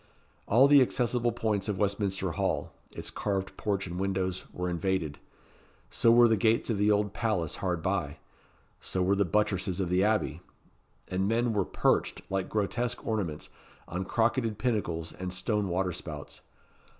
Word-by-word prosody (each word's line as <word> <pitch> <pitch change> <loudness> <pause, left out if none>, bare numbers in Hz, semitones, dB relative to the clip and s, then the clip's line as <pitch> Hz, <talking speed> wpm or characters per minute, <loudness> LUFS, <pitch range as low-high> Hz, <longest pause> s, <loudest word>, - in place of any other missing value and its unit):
All 125 +6 +6
the 145 -1 +7
accessible 120 -1 +1
points 110 -3 -1
of 100 - -1
Westminster 100 -2 0
Hall - - -1 0.2
its - - -6
carved 100 -2 -2
porch 100 -2 -1
and 90 -1 -5
windows 95 -1 -1
were 90 0 -3
invaded. 85 -3 -1 0.7
So 115 - +4
were 120 0 +7
the 115 - +3
gates 110 +3 +2
of 105 - -1
the 105 +1 +3
Old 105 -1 +2
Palace 100 -10 -1
hard 90 -3 -2
by 90 -6 -1 0.6
so 95 - -1
were 95 +2 +3
the 100 0 +2
buttresses 95 -2 0
of 95 -3 -1
the 90 +1 +3
Abbey; 105 -6 0 0.7
and 95 +1 -1
men 115 +2 +1
were 100 -3 +1
perched, - - 0
like 95 -1 -1
grotesque 120 +4 -1
ornaments, 100 -9 -2 0.4
on 90 +3 -3
crocketed 115 0 +1
pinnacles 85 -9 -1
and 90 0 -5
stone 105 +2 -1
water 90 +1 0
spouts. 75 -3 -8
100 Hz, 160 wpm, -29 LUFS, 90-110 Hz, 0.7 s, the